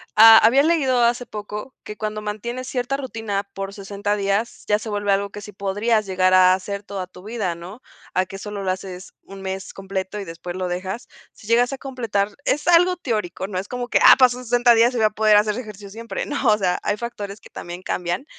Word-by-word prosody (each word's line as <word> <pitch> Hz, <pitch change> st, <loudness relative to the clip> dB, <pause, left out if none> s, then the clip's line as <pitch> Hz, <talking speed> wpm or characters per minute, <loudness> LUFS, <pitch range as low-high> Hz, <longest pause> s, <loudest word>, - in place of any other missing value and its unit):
ha 225 Hz, +1 st, +10 dB
había 250 Hz, +6 st, +5 dB
leído 275 Hz, -7 st, +2 dB
hace 240 Hz, +1 st, +1 dB
poco 210 Hz, +4 st, -7 dB
que 210 Hz, -, -8 dB
cuando 215 Hz, 0 st, -4 dB
mantienes 235 Hz, +5 st, -5 dB
cierta 255 Hz, +1 st, -2 dB
rutina 225 Hz, -7 st, -3 dB
por 195 Hz, 0 st, -5 dB
60 205 Hz, +1 st, -3 dB
días, 200 Hz, +3 st, -1 dB
ya 210 Hz, 0 st, +2 dB
se 220 Hz, -, -7 dB
vuelve 205 Hz, -1 st, -1 dB
algo 200 Hz, +1 st, +1 dB
que 205 Hz, -, -9 dB
sí 210 Hz, -, -9 dB
podrías 205 Hz, +3 st, 0 dB
llegar 185 Hz, -1 st, +2 dB
a 185 Hz, 0 st, +7 dB
hacer 200 Hz, +1 st, -5 dB
toda 195 Hz, -2 st, -6 dB
tu 180 Hz, 0 st, -15 dB
vida, 210 Hz, -4 st, -2 dB
¿no?, 180 Hz, +8 st, -10 dB, 0.3 s
a 185 Hz, -, +2 dB
que 195 Hz, +1 st, -9 dB
solo 205 Hz, -1 st, -6 dB
lo 185 Hz, -, 0 dB
haces 185 Hz, -1 st, -7 dB
un 195 Hz, 0 st, -11 dB
mes 190 Hz, 0 st, -5 dB
completo 195 Hz, +1 st, -4 dB
y 200 Hz, -, -6 dB
después 175 Hz, +1 st, -7 dB
lo 185 Hz, -1 st, -2 dB
dejas. 185 Hz, +7 st, -4 dB, 0.3 s
Si -, -, -17 dB
llegas 240 Hz, +3 st, +3 dB
a -, -, -4 dB
completar 230 Hz, -7 st, -2 dB, 0.2 s
es 295 Hz, +3 st, 0 dB
algo 355 Hz, +1 st, +5 dB
teórico, 215 Hz, -, -3 dB
no 185 Hz, -2 st, -3 dB
es 195 Hz, -, -6 dB
como 245 Hz, +1 st, -4 dB
que, -, -, +2 dB
ah, -, -, +10 dB
pasó 250 Hz, -1 st, +4 dB
60 245 Hz, 0 st, +4 dB
días 235 Hz, +2 st, +4 dB
y -, -, -1 dB
voy 220 Hz, -, +3 dB
a -, -, +4 dB
poder 215 Hz, 0 st, +4 dB
hacer 210 Hz, 0 st, +2 dB
ejercicio 210 Hz, -4 st, -9 dB
siempre, 230 Hz, +2 st, -5 dB
¿no?, 280 Hz, -3 st, -2 dB
o -, -, +1 dB
sea, 180 Hz, -3 st, 0 dB
hay 205 Hz, -, 0 dB
factores 210 Hz, -3 st, -6 dB
que -, -, -15 dB
también 175 Hz, +1 st, -8 dB
cambian, 175 Hz, +9 st, -2 dB
210 Hz, 225 wpm, -22 LUFS, 195-235 Hz, 0.3 s, ha